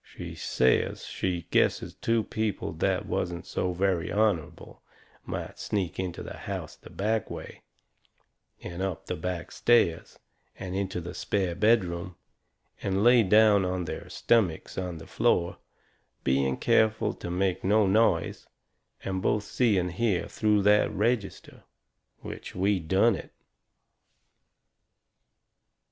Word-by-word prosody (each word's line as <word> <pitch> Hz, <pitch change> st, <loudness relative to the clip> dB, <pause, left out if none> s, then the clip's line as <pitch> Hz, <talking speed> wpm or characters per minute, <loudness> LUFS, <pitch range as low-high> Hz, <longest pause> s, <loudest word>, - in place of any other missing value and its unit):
She -, -, -9 dB
says 65 Hz, 0 st, +1 dB
she 90 Hz, -2 st, -2 dB
guesses -, -, +2 dB
two 115 Hz, -1 st, 0 dB
people 110 Hz, -2 st, -2 dB
that -, -, 0 dB
wasn't 85 Hz, 0 st, -3 dB
so 90 Hz, -, -2 dB
very 90 Hz, -2 st, 0 dB
honourable 105 Hz, -6 st, -1 dB, 0.5 s
might -, -, -5 dB
sneak 95 Hz, -6 st, -2 dB
into 90 Hz, -2 st, -4 dB
the -, -, -7 dB
house -, -, -6 dB
the -, -, -15 dB
back 110 Hz, +1 st, -1 dB
way, -, -, -8 dB, 1.0 s
and 85 Hz, +1 st, -6 dB
up 95 Hz, -3 st, -3 dB
the 90 Hz, -, -3 dB
back 90 Hz, +1 st, -4 dB
stairs, 115 Hz, -9 st, +2 dB, 0.4 s
and 95 Hz, -1 st, -5 dB
into 95 Hz, -2 st, -2 dB
the 85 Hz, +1 st, -7 dB
spare 95 Hz, 0 st, -1 dB
bedroom, 90 Hz, -3 st, +1 dB, 0.7 s
and 95 Hz, +1 st, 0 dB
lay 120 Hz, 0 st, +7 dB
down 105 Hz, 0 st, +5 dB
on 90 Hz, -1 st, -2 dB
their -, -, -6 dB
stummicks 100 Hz, -9 st, +1 dB
on 90 Hz, -3 st, -4 dB
the 80 Hz, -, -10 dB
floor, 85 Hz, 0 st, +1 dB, 0.6 s
being 65 Hz, 0 st, +1 dB
careful 110 Hz, 0 st, +2 dB
to -, -, -7 dB
make 90 Hz, +1 st, 0 dB
no 105 Hz, +2 st, +4 dB
noise, 110 Hz, +4 st, +1 dB, 0.6 s
and 95 Hz, -1 st, -2 dB
both 105 Hz, +2 st, +1 dB
see 110 Hz, -1 st, +1 dB
and 90 Hz, -1 st, 0 dB
hear 95 Hz, 0 st, 0 dB
through 105 Hz, -2 st, +1 dB
that 105 Hz, +1 st, +4 dB
register. 110 Hz, -1 st, -2 dB, 0.6 s
Which -, -, -8 dB
we 95 Hz, +1 st, +2 dB
done 95 Hz, +8 st, +3 dB
it. -, -, -9 dB
95 Hz, 130 wpm, -28 LUFS, 90-105 Hz, 1.0 s, lay